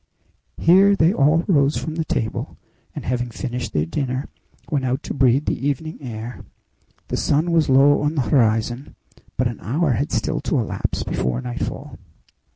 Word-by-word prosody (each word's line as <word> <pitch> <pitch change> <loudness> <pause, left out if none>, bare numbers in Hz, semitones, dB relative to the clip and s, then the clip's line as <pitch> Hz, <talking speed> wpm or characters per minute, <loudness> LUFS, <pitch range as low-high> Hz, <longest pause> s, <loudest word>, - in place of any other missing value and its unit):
Here 195 +4 +5
they 170 0 +3
all 155 +2 +3
rose 145 -5 +3
from 160 - -4
the 165 0 -1
table, 115 -7 -3 0.4
and, - - -6
having 120 0 -1
finished 125 +1 -4
their 75 0 0
dinner, 130 - -3 0.4
went 140 -3 0
out 130 +2 -1
to - - -4
breathe 135 0 +3
the 140 - -1
evening 155 +3 -3
air. 120 -2 -7 0.7
The - - -1
sun 155 +4 +1
was 165 -4 +2
low 140 +2 +5
on 150 +2 0
the 140 - +2
horizon, 115 +2 +1 0.4
but 125 - +2
an 120 - -6
hour 150 +6 0
had 130 +5 -1
still 155 -1 -1
to 150 - 0
elapse 115 -5 -2
before 60 -1 -1
nightfall. - - -5
135 Hz, 165 wpm, -21 LUFS, 120-155 Hz, 0.7 s, Here